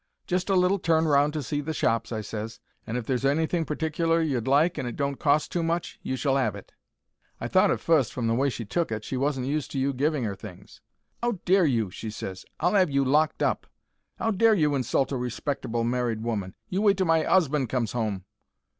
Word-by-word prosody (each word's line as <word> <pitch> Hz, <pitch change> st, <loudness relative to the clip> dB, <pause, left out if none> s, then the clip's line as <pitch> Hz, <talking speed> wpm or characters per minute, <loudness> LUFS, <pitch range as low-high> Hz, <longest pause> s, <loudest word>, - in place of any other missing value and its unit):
"'Just 180 Hz, +2 st, -1 dB
a 195 Hz, -, +3 dB
little 185 Hz, +2 st, +3 dB
turn 160 Hz, -1 st, +2 dB
round 145 Hz, 0 st, +4 dB
to 150 Hz, -1 st, -3 dB
see 145 Hz, +4 st, -2 dB
the 155 Hz, +2 st, -4 dB
shops,' 115 Hz, -3 st, 0 dB
I 110 Hz, -2 st, -2 dB
ses; 110 Hz, +1 st, -6 dB, 0.3 s
'and 115 Hz, -, -2 dB
if 120 Hz, -, -4 dB
there's 130 Hz, +1 st, -1 dB
anything 160 Hz, +4 st, +1 dB
particler 165 Hz, +2 st, 0 dB
you'd 135 Hz, -8 st, -1 dB
like 150 Hz, +6 st, +3 dB
and 125 Hz, -, -3 dB
it 120 Hz, -, -5 dB
don't 140 Hz, -1 st, -2 dB
cost 145 Hz, +1 st, +2 dB
too 175 Hz, -, 0 dB
much, 165 Hz, +1 st, -2 dB
you 130 Hz, -, -3 dB
shall 135 Hz, +1 st, +1 dB
'ave 110 Hz, -6 st, 0 dB
it.' 100 Hz, -, -13 dB, 0.7 s
"I -, -, -3 dB
thought -, -, +4 dB
at -, -, +1 dB
fust, 155 Hz, -8 st, +2 dB
from 125 Hz, -, -3 dB
the 115 Hz, -, +2 dB
way 135 Hz, +4 st, +2 dB
she 120 Hz, -3 st, -5 dB
took 160 Hz, +8 st, -1 dB
it, 110 Hz, -1 st, -3 dB
she 130 Hz, -, -4 dB
wasn't 135 Hz, -1 st, 0 dB
used 150 Hz, +1 st, -2 dB
to 135 Hz, -, -1 dB
you 135 Hz, +1 st, +1 dB
giving 140 Hz, 0 st, 0 dB
'er 100 Hz, -, -2 dB
things. 95 Hz, -2 st, -12 dB, 0.4 s
"'Ow 240 Hz, 0 st, +1 dB
dare 190 Hz, 0 st, +4 dB
you!' 115 Hz, -8 st, 0 dB
she 110 Hz, -, -6 dB
ses. 95 Hz, -3 st, -7 dB
'I'll 175 Hz, +5 st, +2 dB
'ave 185 Hz, -5 st, +3 dB
you 140 Hz, 0 st, +2 dB
locked 150 Hz, +4 st, +2 dB
up. -, -, 0 dB, 0.5 s
'Ow 225 Hz, -, +1 dB
dare 220 Hz, +2 st, +4 dB
you 150 Hz, -6 st, +2 dB
insult 135 Hz, 0 st, 0 dB
a 135 Hz, -, -1 dB
respectable 125 Hz, -1 st, -2 dB
married 120 Hz, -2 st, -1 dB
woman! 100 Hz, -5 st, -3 dB
You 190 Hz, +2 st, -1 dB
wait 200 Hz, -2 st, +4 dB
till 190 Hz, -, +1 dB
my 165 Hz, -1 st, +3 dB
'usband 150 Hz, -8 st, +2 dB
comes 120 Hz, -3 st, -1 dB
'ome.' 105 Hz, -6 st, -2 dB
140 Hz, 225 wpm, -26 LUFS, 120-160 Hz, 0.7 s, round